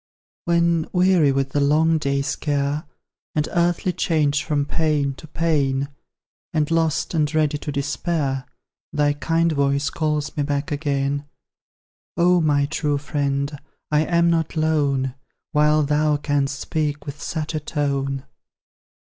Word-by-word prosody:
When 170 -1 +2
weary 180 -5 +4
with 135 0 0
the 145 - +1
long 155 +3 +3
day's 140 +1 -1
care, 145 0 -1 0.5
And 150 -1 +1
earthly 175 +1 +1
change 155 -4 +1
from 145 -2 0
pain 150 -3 0
to 155 - -12
pain, 140 -4 0 0.7
And 155 0 +1
lost, 165 0 +1
and 150 -3 +1
ready 150 -2 +2
to 150 - -4
despair, 140 -1 -2 0.4
Thy 145 -1 +2
kind 165 +3 +1
voice 140 -1 +1
calls 150 -1 -1
me 150 - 0
back 145 0 -2
again: 145 -1 -1 0.9
Oh, 175 0 +4
my 145 -2 +3
true 145 0 -1
friend! 140 0 -1 0.4
I 150 - +4
am 170 0 +3
not 165 -1 0
lone, 145 -5 +1 0.4
While 150 0 +4
then 150 +1 +2
canst 145 -1 -1
speak 150 -2 -2
with 145 0 -7
such 160 -1 -3
a 155 - -1
tone! 140 -3 -2
150 Hz, 135 wpm, -22 LUFS, 140-160 Hz, 0.9 s, weary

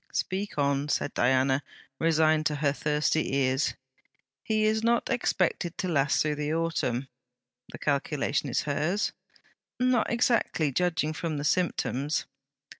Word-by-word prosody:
'Speak 195 0 -3
on,' 140 0 +1
said 145 - -1
Diana, 130 +2 +2 0.4
resigned 155 -1 +3
to 150 - -2
her 145 -1 +1
thirsty 150 -1 0
ears. 135 0 +1 0.7
'He 215 -1 +1
is 220 0 +2
not 235 +3 +1
expected 180 -7 0
to 185 - -2
last 145 -4 +2
through 155 -1 0
the 150 +1 -1
autumn.' 150 -6 -1 0.6
'The - - -8
calculation 145 0 -1
is 120 - +1
hers?' 155 +8 0 0.7
'Not 250 -2 +2
exactly: 235 - +1
judging 165 0 0
from 160 -1 -3
the 145 - -3
symptoms.' 150 -3 0
155 Hz, 130 wpm, -28 LUFS, 140-180 Hz, 0.7 s, resigned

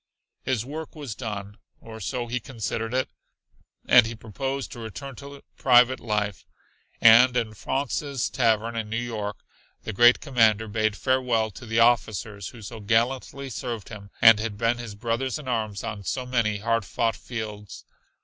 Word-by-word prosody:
His 125 -3 -1
work 155 +4 -7
was 145 -7 -6
done, 105 -3 -6 0.2
or 110 -1 -10
so 120 +5 -3
he 120 +1 -2
considered 115 -2 -4
it, 130 +1 0 0.8
and 120 -2 +7
he 115 - -6
proposed 135 +5 -4
to 120 - -8
return 115 +5 -7
to 140 0 -11
private 125 0 +5
life. 105 -3 -2 0.6
And 120 +3 +7
in 115 -3 -1
Fraunces' 135 +3 -2
Tavern 115 -2 +1
in 110 -2 -3
New 115 - -2
York 110 -4 -4 0.5
the 110 - -5
great 120 +5 +6
commander 110 -6 +2
bade 110 0 0
farewell 125 -4 +1
to 120 +5 -11
the 115 +1 +2
officers 110 -4 +1
who - - -11
had 110 - -10
so 115 +2 -8
gallantly 125 +5 0
served 120 -6 -5
him 100 -2 -10
and 115 -1 +9
had 110 -2 -3
been 115 +2 +1
his 115 -4 -7
brothers 120 +5 -2
in 150 -3 -10
arms 110 -5 -2
on 100 -2 -5
so 130 +5 -3
many 120 -4 0
hard 115 +1 0
fought 115 +4 -1
fields. 105 -4 -7
115 Hz, 170 wpm, -25 LUFS, 110-125 Hz, 0.8 s, and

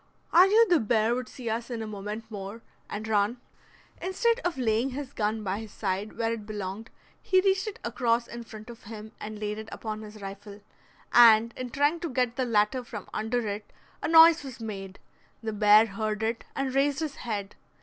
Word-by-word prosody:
I 360 +3 +8
knew 445 +3 +5
the 350 -4 +4
bear 220 0 +2
would 250 -2 -3
see 245 +1 -9
us 230 +2 -2
in 230 -2 -4
a - - -4
moment 210 +1 -6
more, 205 +2 -7 0.3
and 215 +1 -5
run." 210 +2 +1 0.6
Instead 460 +6 +1
of 350 - -2
laying 235 +1 +1
his 270 +1 -6
gun 215 0 -1
by 195 +1 -2
his 220 -2 -9
side, 200 +1 -3
where 230 0 0
it 215 -2 -7
belonged, 205 +1 -5 0.3
he 375 - +3
reached 385 +1 +2
it 425 - -5
across 235 0 +1
in 235 0 -8
front 220 0 -10
of 235 - -14
him 215 0 -9
and 215 0 -6
laid 210 0 -3
it 220 0 -8
upon 215 -1 -5
his 215 0 -10
rifle, 200 +1 -9 0.5
and 230 -1 +7
in 255 -1 -5
trying 290 +6 +1
to 340 -1 -4
get 250 -2 0
the 260 - 0
latter 230 +2 +2
from 210 -4 -8
under 225 +1 -1
it 205 +1 -5 0.3
a - - -1
noise 325 0 +8
was 260 -4 -8
made; 195 -4 -6 0.5
the 220 -1 -3
bear 210 +1 +6
heard 215 +1 -3
it 225 +1 -2
and 270 -1 -2
raised 280 +2 +2
his 305 -3 -4
head. 210 -4 -4
225 Hz, 200 wpm, -28 LUFS, 210-255 Hz, 0.6 s, I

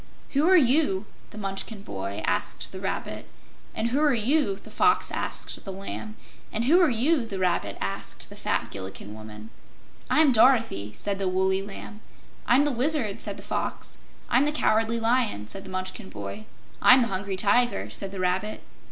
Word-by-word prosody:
"Who 295 +5 +3
are 375 - +8
you?" 255 - +3 0.2
the - - -12
Munchkin 195 +1 -5
boy 100 - -5
asked - - -1
the - - -7
Rabbit; - - -4 0.5
and 225 +2 0
"Who 265 +4 +1
are 300 -3 +4
you?" 240 -1 +2
the 210 +2 -14
Fox 425 - +3
asked - - -3
the 195 - -6
Lamb; 200 +3 -6 0.4
and 225 +2 -1
"Who 340 +8 +6
are 345 - +5
you?" 260 +4 +2
the 210 -4 -5
Rabbit 175 - 0
asked 95 0 -3
the - - -9
fat - - -2
Gillikin 95 +1 -7
woman. 110 0 -10 0.6
"I'm 305 -3 +5
Dorothy," 225 - +3
said 200 -1 -3
the 195 - 0
woolly 190 +1 +1
Lamb. 205 +2 -9 0.5
"I'm 265 +4 +5
the 295 - +1
Wizard," 250 -4 0
said - - -2
the - - -10
Fox. - - -4 0.3
"I'm 255 +4 +3
the 295 - +1
Cowardly 225 -5 +1
Lion," 225 - +1
said 195 - -8
the - - -9
Munchkin 185 +2 -5
boy. 100 +1 -7 0.4
"I'm 255 0 +7
the 235 - -2
Hungry 195 0 -2
Tiger," 240 +5 +2
said 195 -1 -2
the 195 - -6
Rabbit. 185 +4 -1
210 Hz, 180 wpm, -26 LUFS, 185-250 Hz, 0.6 s, are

